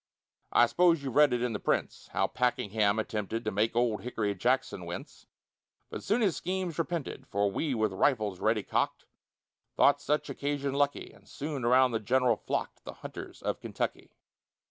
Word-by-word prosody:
I 120 - +6
s'pose 170 +3 +3
you've 135 -3 -4
read 150 0 +6
it 120 0 0
in 125 -2 -1
the 105 - -3
prints, - - -1
How - - 0
Pakenham 110 -4 +1
attempted 110 +1 -3
To 110 - 0
make 105 +3 0
old 120 -2 +1
Hickory 110 -4 -2
Jackson 110 -3 0
wince, 85 - -8 0.6
But - - -5
soon 215 +5 +1
his 195 -7 +2
schemes 180 -2 -3
repented; 165 -3 -3
For 100 0 0
we, 140 +5 -1
with 110 -3 0
rifles 105 -3 +1
ready 110 -1 +1
cock'd, - - -1 0.7
Thought 145 0 +4
such 150 +1 0
occasion 140 0 -2
lucky, 145 0 0
And - - -20
soon 145 -3 -4
around 125 +2 +5
the 115 - 0
general 125 +2 +2
flock'd - - -4
The - - -7
hunters - - -8
of - - -1
Kentucky. - - -4
125 Hz, 170 wpm, -30 LUFS, 110-145 Hz, 0.7 s, I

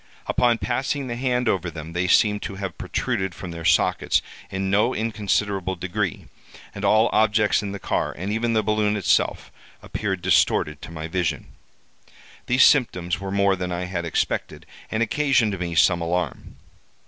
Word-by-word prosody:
Upon 120 -2 +2
passing 135 +7 -2
the 120 -2 -4
hand 125 -1 0
over 90 -4 0
them 80 0 -8
they 90 +1 0
seemed 105 +2 +3
to 100 - -5
have 95 -2 -6
protruded 95 -1 -2
from 90 - -7
their 85 -1 -7
sockets 85 +1 +2 0.3
in 95 -1 -2
no 110 +5 +2
inconsiderable 100 -3 -1
degree; 90 +1 -3 0.5
and 100 - -7
all 110 +3 +4
objects 110 -1 +3
in 100 -1 -4
the 100 - -5
car, - - -1
and 95 +4 -3
even 115 +1 0
the 110 -1 +2
balloon 105 0 +1
itself, 100 - +1 0.3
appeared 95 -4 -3
distorted 75 -1 +2
to - - -9
my 80 -1 -6
vision. 80 -4 -2 0.9
These 125 +2 +5
symptoms 90 -10 +3
were 95 0 -5
more 100 0 +2
than 90 -1 -4
I 90 +1 -2
had 90 -1 -3
expected, 85 - -2 0.2
and 110 +1 0
occasioned 115 -5 +1
me 85 -1 -3
some 85 +1 +4
alarm. 85 -2 -3
100 Hz, 165 wpm, -23 LUFS, 90-110 Hz, 0.9 s, These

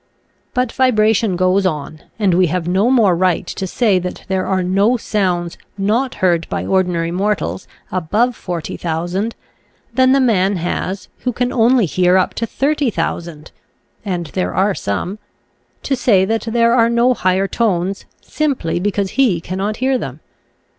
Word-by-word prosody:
But 250 -1 +1
vi 260 -1 +2
bration 215 -3 +2
goes 185 +2 +2
on, 155 -3 -3 0.2
and 200 -5 +2
we 180 +1 +4
have 170 +1 -2
no 190 +6 +2
more 220 -9 +4
right 180 0 +1
to 190 +2 -5
say 205 -1 +2
that 180 0 -6
there 190 -1 -1
are 190 -1 0
no 200 +7 +2
sounds 180 -6 -1 0.2
not 225 +7 0
heard 170 -2 +1
by - - -3
ordinary 180 -3 0
mortals, 180 - -2 0.2
above 210 +8 0
40,000, 175 +4 -3 0.6
than 260 +1 +4
the 275 - +4
man 205 -6 +2
has, 185 +2 -3
who 250 - -1
can 245 +1 -2
only 240 -1 +4
hear 180 +2 +2
up 185 - +1
to 230 - -3
30,000 175 - -2 0.5
(and 180 -4 -3
there 185 - -2
are 200 +2 +2
some), 175 - -3 0.6
to 275 - 0
say 205 -7 +3
that 225 +3 -1
there 235 0 +3
are 230 -2 +4
no 235 +2 +3
higher 190 -2 +1
tones 195 -3 -1 0.2
simply 270 - -1
because 200 0 -1
he 245 -11 +2
cannot 195 +5 -3
hear 260 0 +1
them. 135 - -6
195 Hz, 155 wpm, -18 LUFS, 180-230 Hz, 0.6 s, we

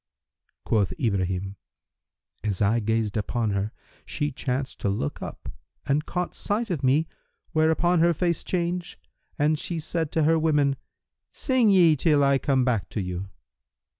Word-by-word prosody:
Quoth 105 -4 +1
Ibrahim, 95 - -1 0.9
"As 105 -4 -1
I 110 +3 +3
gazed 110 -1 -1
upon 110 +1 -1
her, 100 +2 -1 0.3
she 145 0 -2
chanced 130 0 -3
to 100 - 0
look 100 -8 -3
up - - -7 0.4
and 145 +3 0
caught 180 0 -2
sight 215 +1 -2
of 155 -6 -2
me 145 +5 +3 0.4
whereupon 160 +2 +3
her 170 +1 +5
face 170 0 0
changed 175 0 -2 0.4
and 150 +1 +2
she 170 - -4
said 160 0 -2
to 160 - +2
her 160 +2 +4
women, 150 -3 +2 0.5
'Sing 255 -5 +2
ye 175 -5 +6
till 150 0 +3
I 140 -1 +3
come 135 -3 +1
back 110 -9 0
to - - -4
you.' 90 0 -4
140 Hz, 150 wpm, -25 LUFS, 110-165 Hz, 0.9 s, ye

